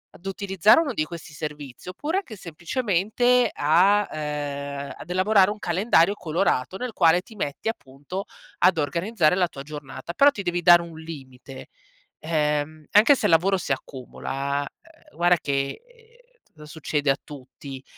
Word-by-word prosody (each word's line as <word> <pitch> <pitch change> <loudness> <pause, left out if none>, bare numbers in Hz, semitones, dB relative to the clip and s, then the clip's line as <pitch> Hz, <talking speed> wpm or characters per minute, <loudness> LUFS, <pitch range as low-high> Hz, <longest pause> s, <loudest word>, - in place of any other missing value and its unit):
ad 175 - -18
utilizzare 195 - +3
uno 280 -6 -2
di 155 - -1
questi 170 -2 -10
servizi, 150 0 -7
oppure 295 - -3
anche 255 - -10
semplicemente 210 +7 0
a 185 +8 +3
uhm, 145 -2 -4
ad - - -11
elaborare 190 +2 +3
un 210 - -6
calendario 185 0 +2
colorato, 170 -2 -1
nel 250 -1 -5
quale 170 0 +4
ti 220 - -16
metti, 150 +1 -4
appunto, 145 - -7 0.3
ad 185 -2 +4
organizzare 170 +4 +1
la 180 -1 +2
tua 135 -4 -10
giornata. 145 +2 -8
Però 280 +10 +6
ti 200 - -6
devi 175 0 -1
dare 175 0 +8
un 165 -2 -11
limite. 135 -4 -10 0.5
Ehm, 150 -1 -1
anche 220 +8 +7
se - - 0
il - - +2
lavoro 190 +4 +3
si 160 - -2
accumula, 135 +2 -4 0.4
uhm, - - -23
guarda 175 0 +4
che, 140 - -2 0.7
uhm, 150 - -13
t 150 - -13
succede 150 -2 -1
a 135 - +2
tutti, 135 -1 -11
165 Hz, 155 wpm, -24 LUFS, 145-195 Hz, 0.7 s, dare